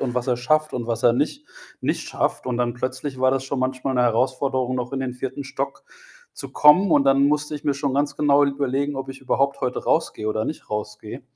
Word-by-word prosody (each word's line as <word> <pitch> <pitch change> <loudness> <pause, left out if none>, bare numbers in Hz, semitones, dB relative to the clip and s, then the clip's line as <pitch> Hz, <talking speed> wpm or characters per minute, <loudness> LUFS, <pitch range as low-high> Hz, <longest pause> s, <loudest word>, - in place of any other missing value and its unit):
und 125 -2 -2
was 125 - -1
er 125 -2 +1
schafft 155 +5 +1
und 120 -2 -3
was 115 - -2
er 120 - +6
nicht 150 - -2 0.3
nicht - - -2
schafft. - - -1
Und 125 -2 -1
dann 120 -1 0
plötzlich 130 +2 -4
war 130 - +4
das 135 0 -1
schon 135 0 -3
manchmal 130 +1 -1
'ne 125 - +3
Herausforderung, 130 +2 +1
noch 125 +1 -4
in 135 - -2
den 125 -2 -3
4. 130 +2 -5
Stock 140 +1 -5 0.5
zu - - -7
kommen. 170 +6 +6
Und 140 -3 +4
dann 135 0 +4
musste 150 0 0
ich 145 - -7
mir 145 - +1
schon 140 -1 -2
ganz 145 +1 0
genau 145 -1 +4
überlegen, 140 0 -1
ob 135 - -5
ich 135 0 -8
überhaupt 140 +1 0
heute 125 -1 -2
rausgehe 110 0 0
oder 110 0 -1
nicht 155 - -6
rausgehe. 105 +3 -5
135 Hz, 225 wpm, -23 LUFS, 125-140 Hz, 0.5 s, er